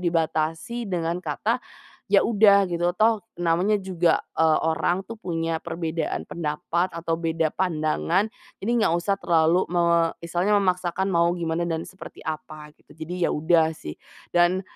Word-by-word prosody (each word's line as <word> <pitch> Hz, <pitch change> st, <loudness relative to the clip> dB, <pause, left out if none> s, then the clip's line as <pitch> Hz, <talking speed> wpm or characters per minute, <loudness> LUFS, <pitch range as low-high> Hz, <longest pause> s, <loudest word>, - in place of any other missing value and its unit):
dibatasi 165 Hz, +8 st, -1 dB
dengan 170 Hz, -1 st, -2 dB
kata, 195 Hz, -, -1 dB, 0.5 s
"Ya 200 Hz, -2 st, +4 dB
udah 200 Hz, -4 st, +4 dB
gitu 175 Hz, +1 st, 0 dB
toh 220 Hz, +2 st, +3 dB, 0.2 s
namanya 175 Hz, +4 st, +1 dB
juga, 175 Hz, -3 st, +1 dB, 0.2 s
eee, 160 Hz, -1 st, +4 dB
orang 160 Hz, +3 st, 0 dB
tuh 225 Hz, +3 st, -10 dB
punya 165 Hz, -4 st, -2 dB
perbedaan 165 Hz, -1 st, -3 dB
pendapat 170 Hz, +2 st, -2 dB
atau 165 Hz, -1 st, -2 dB
beda 165 Hz, -1 st, 0 dB
pandangan 175 Hz, +3 st, 0 dB, 0.3 s
jadi 210 Hz, -, -1 dB
nggak 170 Hz, -, +2 dB
usah 195 Hz, +3 st, -1 dB
terlalu 165 Hz, +2 st, +3 dB
me 170 Hz, -1 st, +3 dB, 0.2 s
misalnya 175 Hz, +5 st, +1 dB
memaksakan 185 Hz, -1 st, 0 dB
mau 170 Hz, -1 st, +3 dB
gimana 170 Hz, 0 st, -2 dB
dan 165 Hz, -1 st, -2 dB
seperti 190 Hz, -, -11 dB
apa," 155 Hz, -1 st, -6 dB
gitu. 150 Hz, -, -20 dB
Jadi 170 Hz, +2 st, -2 dB
ya -, -, 0 dB
udah 160 Hz, +1 st, +3 dB
sih 75 Hz, -, -9 dB, 0.3 s
dan, 175 Hz, +2 st, +3 dB
170 Hz, 145 wpm, -24 LUFS, 160-185 Hz, 0.5 s, Ya